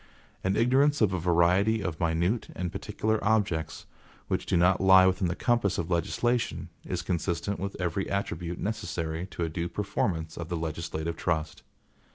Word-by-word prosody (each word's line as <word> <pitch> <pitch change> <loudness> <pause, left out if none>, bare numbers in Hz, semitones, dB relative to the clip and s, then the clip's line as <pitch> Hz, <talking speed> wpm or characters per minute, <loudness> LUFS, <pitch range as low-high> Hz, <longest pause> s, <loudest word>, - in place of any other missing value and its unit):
An 95 +1 +1
ignorance 135 +5 +3
of 105 -4 +3
a 95 - 0
variety 90 +6 +3
of 90 -4 -3
minute 85 +6 0
and 90 -1 -3
particular 110 +2 -2
objects, 100 -8 0 0.4
which - - -1
do - - +2
not 90 +2 +4
lie 95 -1 +7
within 95 0 +2
the 85 - -2
compass 115 -6 +1
of 85 +1 -3
legislation, 120 +8 0
is - - -3
consistent 85 +2 -2
with 100 +1 -5
every 90 +2 -1
attribute 85 -3 -3
necessary 85 -5 -3
to 85 - -4
a - - 0
due 85 +2 -3
performance 85 -5 -2
of 85 -1 -6
the 85 - -2
legislative 80 0 -4
trust. 80 -3 -2
90 Hz, 165 wpm, -28 LUFS, 85-100 Hz, 0.4 s, lie